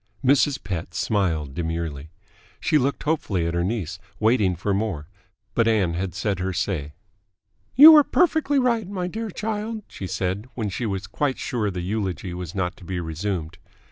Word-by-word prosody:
Mrs. 140 +1 +3
Pett 90 -1 -5
smiled 80 -9 0
demurely. 80 -2 -4 0.5
She 155 - +2
looked 140 +2 -1
hopefully 115 - 0
at 85 - -1
her 85 0 0
niece, 90 -5 -3 0.2
waiting 110 -4 +3
for 100 +4 -1
more, 95 -8 -2 0.5
but 115 -1 +2
Ann 100 -7 +2
had 90 +1 -3
said 100 -1 -1
her 95 +1 -2
say. 75 -6 -2 0.8
"You 310 +4 +11
are 300 - +8
perfectly 315 -3 +2
right, 235 -6 +1
my 185 -3 -3
dear 220 +5 -4
child," 215 +2 -4
she 95 - -7
said 95 +5 -2
when 110 -4 -2
she 115 +5 -3
was 100 -1 -3
quite 135 +7 -1
sure 110 -4 -1
the 90 -2 -4
eulogy 95 -2 -3
was 90 0 -6
not 90 -2 -1
to - - -14
be 90 0 -4
resumed. 80 -1 -4
100 Hz, 170 wpm, -24 LUFS, 90-135 Hz, 0.8 s, You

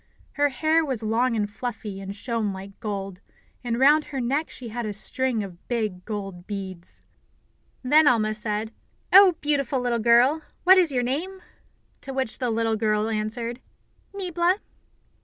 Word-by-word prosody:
Her 290 0 +2
hair 315 +5 +2
was 260 -7 -3
long 230 +3 +1
and 210 -2 0
fluffy, 205 -2 -6
and 195 +1 -6
shone 225 -1 -2
like 195 +1 -9
gold, 195 -3 -5 0.4
and 235 -1 -1
round 295 +3 +5
her 275 - -5
neck 275 +6 -1
she 245 -3 -8
had 240 +2 -4
a 215 -2 -3
string 235 +2 0
of 180 -3 -11
big, 215 -7 -2
gold 195 -4 -6
beads. 190 -4 -7 0.8
Then 295 +4 +5
Alma 215 -4 +3
said, 215 +1 -3 0.4
"Oh, 385 -1 +9
beautiful 280 -3 0
little 245 -1 0
girl, 240 +7 +4 0.2
what 375 +1 +7
is 345 -5 +2
your 250 -2 0
name?" 345 +10 -3 0.6
To 270 - -7
which 260 -4 -2
the 250 - -1
little 225 0 0
girl 215 0 +1
answered: 230 +3 -3 0.5
"Niebla." 360 -2 0
235 Hz, 160 wpm, -25 LUFS, 210-275 Hz, 0.8 s, Oh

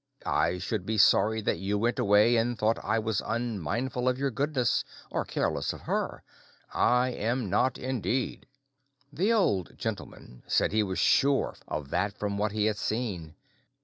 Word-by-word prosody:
I 90 - +1
should 90 +2 -3
be 110 +3 -2
sorry 105 +2 +4
that - - -1
you 100 +2 -1
went 120 +3 0
away 105 +4 +4
and 120 +1 +1
thought 110 +2 0
I 110 - +1
was 110 -2 -1
unmindful 115 - -2
of 125 - -1
your 140 0 -1
goodness, 135 -1 0 0.3
or - - -1
careless - - -1
of - - -10
her; - - -2 0.5
I 125 +1 +3
am 120 -3 -2
not, 125 +6 +2
indeed." 130 0 -2 0.7
The 195 +9 +1
Old 105 - +1
Gentleman - - -6
said - - +2
he 110 +1 +2
was 95 -3 -2
sure 140 0 +3
of 75 -2 -5
that 100 0 -1
from 100 -1 -2
what 105 0 0
he 105 0 0
had 110 -1 0
seen. 100 -9 -3
110 Hz, 165 wpm, -28 LUFS, 100-125 Hz, 0.7 s, sorry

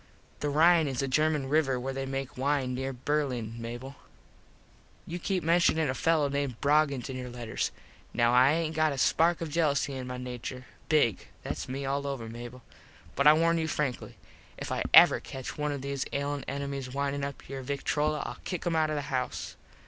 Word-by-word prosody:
The 145 - -1
Rine 160 +2 +5
is 135 -1 -2
a - - 0
German 150 0 +1
river 135 -3 +2
where 135 +2 -3
they 135 0 -3
make 135 +1 -4
wine 135 -1 0
near 135 +1 -2
Berlin, 130 -4 -2
Mable. 120 +4 -7 1.1
You 175 +2 -5
keep 185 0 -1
menshuning 165 -1 +3
a 130 - 0
fello 155 +1 +2
named 140 -4 -2
Broggins 145 -3 +2
in 130 - -5
your 125 -1 -5
letters. 120 -2 -3 0.4
Now 120 0 +2
I 130 +3 +6
aint 160 -1 -1
got 155 -1 +2
a - - -5
spark 165 +5 +3
of 165 - -3
jelusy 145 -3 +1
in 130 -1 -5
my 125 0 -5
nature. 125 0 -6 0.2
Big. 145 - +2 0.2
Thats - - -4
me 135 +2 -3
all 140 +1 -1
over, 135 -5 -4
Mable. 120 +2 -9 0.5
But 140 +2 +4
I 150 - +10
warn 165 +1 +3
you 160 - -1
frankly. 150 -5 -3 0.4
If - - -6
I - - -1
ever - - +8
catch 130 -1 -7
one 150 0 -1
of 140 -2 -4
those 140 -1 -2
ailin 140 0 -2
enemies 140 -1 -4
windin 140 +1 -2
up 140 -1 -6
your 135 0 -5
victrola 150 +3 -1
Ill - - -6
kick 180 -3 -4
him 175 -2 0
out 155 -1 +2
of 155 - -1
the 145 - -2
house. 125 -1 -3
140 Hz, 195 wpm, -29 LUFS, 130-155 Hz, 1.1 s, I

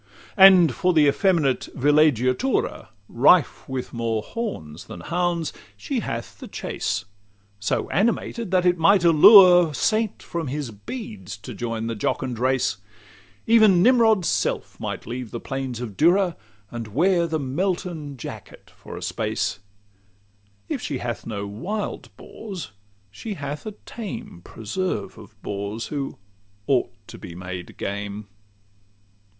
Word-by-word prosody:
LXXVIII 195 -3 +10
And 180 -4 +5
for 180 0 +1
the 155 -2 +5
effeminate 150 -4 +2
villeggiatura 145 - +2 0.2
Rife 140 +4 +3
with 130 -1 -4
more 115 -2 -1
horns 85 - -6
than 85 - -9
hounds 170 - -1 0.2
she 275 -4 -3
hath 115 - -5
the - - -8
chase, - - -3 0.5
So 100 - -1
animated 230 +2 0
that 180 -1 +2
it 175 -1 +3
might 185 +3 +5
allure 175 -1 +8
Saint 220 +4 0
from 170 -3 -4
his 140 -2 -4
beads 105 - -8
to 100 - -9
join 115 -2 -4
the 115 - -2
jocund 120 +3 -2
race; 130 -7 +1 0.7
Even 215 -6 +5
Nimrod's 225 -6 +4
self - - -1
might - - -5
leave 120 +1 -5
the 120 - -6
plains 135 -2 -4
of 115 -5 -6
Dura, 175 - +3 0.4
And 115 -2 -5
wear 170 - +2
the 160 -1 -1
Melton 155 0 -3
jacket - - -10
for - - -10
a - - -7
space: - - -2 1.1
If - - -3
she - - -3
hath - - -5
no 100 -3 -4
wild 180 - -5
boars, 195 - -8 0.4
she 205 - -6
hath 145 +2 -6
a 215 - -5
tame 225 - -7
Preserve 150 - -4
of - - -15
bores, 100 +3 -4
who 140 -2 -4 0.5
ought 130 0 +1 0.2
to - - -11
be 85 - -9
made 90 0 -8
game. 100 +1 -5
150 Hz, 135 wpm, -23 LUFS, 115-185 Hz, 1.1 s, LXXVIII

